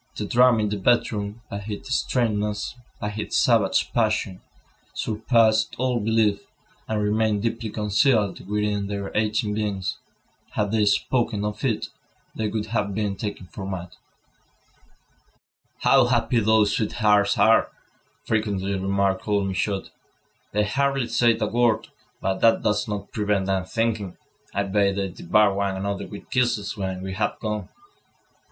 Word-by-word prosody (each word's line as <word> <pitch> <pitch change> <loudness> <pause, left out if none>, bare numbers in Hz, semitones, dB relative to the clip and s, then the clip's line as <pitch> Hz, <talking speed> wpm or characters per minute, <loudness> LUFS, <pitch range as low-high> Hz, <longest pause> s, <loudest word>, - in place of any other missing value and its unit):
The 105 - -3
drama 120 0 +4
in 105 - 0
the 105 0 -3
bedroom, 105 0 0
by 100 0 -6
its 110 +4 -4
strangeness, 105 -5 0 0.3
by 105 - -3
its 105 - -2
savage 115 -6 +2
passion, 110 -5 0 0.5
surpassed 110 0 +2
all 125 -1 0
belief, 110 -2 +1 0.4
and 110 -1 -1
remained 105 0 +1
deeply 115 -1 -2
concealed 105 -1 +1
within 105 -1 0
their 100 -1 -5
aching 105 0 +1
beings. 100 -3 -2 0.5
Had 105 -1 0
they 110 -1 +2
spoken 105 +1 +1
of 105 +1 -4
it, 115 -6 -1 0.4
they 110 - -2
would 105 0 -2
have 105 -3 -2
been 105 -2 -1
taken 100 -2 -5
for 95 +2 -9
mad. 95 -2 -5 1.9
"How 135 -2 +5
happy 120 0 +2
those 110 -1 +3
sweethearts 105 -2 +2
are!" 115 +1 +4 0.6
frequently 100 -3 -1
remarked 100 0 0
old 100 -1 +1
Michaud. 95 +1 -1 0.7
"They 105 +1 +1
hardly 135 +3 0
say 120 -1 +3
a - - +1
word, 115 0 +1 0.3
but 95 0 -1
that 115 0 +4
does 110 +3 +1
not 105 -2 -5
prevent 105 -2 0
them 95 -1 0
thinking. 110 -3 -2 0.3
I 100 - 0
bet 100 0 +1
they 100 -1 -1
devour 100 +4 +2
one 100 -1 -1
another 100 +1 -3
with 100 - -11
kisses 120 -5 0
when 95 -2 -4
we 95 0 -4
have 105 +3 -1
gone." 105 -3 -3
105 Hz, 145 wpm, -24 LUFS, 100-110 Hz, 1.9 s, How